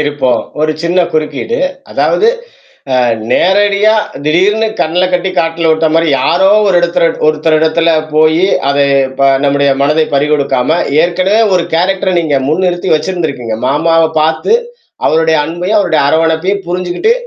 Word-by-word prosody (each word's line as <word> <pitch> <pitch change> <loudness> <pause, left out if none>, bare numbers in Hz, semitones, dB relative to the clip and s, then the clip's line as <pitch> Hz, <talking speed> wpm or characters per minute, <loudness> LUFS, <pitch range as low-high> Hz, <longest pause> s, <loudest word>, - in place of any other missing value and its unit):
இருப்போம். 145 -4 0 0.2
ஒரு 155 0 +1
சின்னக் 170 0 0
குறுக்கீடு. 155 - -2 0.3
அதாவது 440 - +1 0.7
அ - - +2 0.3
நேரடியா 205 +3 +2 0.3
திடீர்ன்னு 200 +8 +1
கண்ணுலக்கட்டி 180 +2 0
காட்டுல 165 -1 0
விட்டமாரி 160 +1 +1 0.2
யாரோ 175 +7 +2 0.2
ஒரு 195 - +1
இடத்துல 170 -1 +1 0.2
ஒருத்தர் 155 +1 +1
இடத்துல 160 +1 +1 0.3
போயி, 155 +3 +3 0.2
அத 140 0 0 0.7
நம்முடைய 140 0 +1
மனதை 155 +2 +2
பறிகொடுக்காம 145 +1 0 0.2
ஏற்கனவே 185 +5 +1 0.2
ஒரு 170 - -1
கேரக்டர் 185 +1 0
நீங்க 150 -4 0
முன்னிறுத்தி 180 +2 -1
வச்சிருந்தீங்க. 150 -9 -3
மாமாவப் 160 +3 +1
பார்த்து 160 - 0 0.5
அவருடைய 160 0 +2
அன்பையும் 175 +7 -1
அவருடைய 170 -6 0
அரவணைப்பையும் 165 +6 0
புரிஞ்சுக்கிட்டு 180 - -1
165 Hz, 120 wpm, -11 LUFS, 155-185 Hz, 0.7 s, போயி